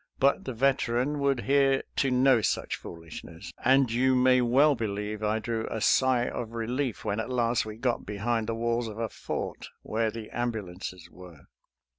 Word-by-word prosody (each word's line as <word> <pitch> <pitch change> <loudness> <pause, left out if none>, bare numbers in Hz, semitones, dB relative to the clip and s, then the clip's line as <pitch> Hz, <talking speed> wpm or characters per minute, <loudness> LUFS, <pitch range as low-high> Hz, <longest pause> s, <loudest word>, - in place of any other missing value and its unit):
But 140 +1 +2
the 130 - -4
Veteran 130 +2 +1
would 140 -3 +1
hear 135 0 +3
to 135 - +2
no 130 -1 +4
such - - -1
foolishness, 85 +1 -10
and 130 -1 +4
you 130 +2 +3
may 125 0 +4
well 135 +5 +4
believe 105 -2 -3
I 110 +1 +1
drew 110 0 -3
a 110 - -3
sigh 125 +2 +3
of 115 -1 -5
relief 120 +2 -2
when 105 0 -1
at 110 - -3
last 120 -3 +1
we 110 0 -7
got 120 0 -1
behind 110 +2 -2
the 115 - -1
walls 115 +1 -1
of 110 -1 -7
a 115 -1 -2
fort, - - -5 0.2
where 110 0 0
the 110 0 -8
am 120 0 -1
bulances 90 -3 -7
were. 90 -5 -13
115 Hz, 180 wpm, -28 LUFS, 110-130 Hz, 0.2 s, no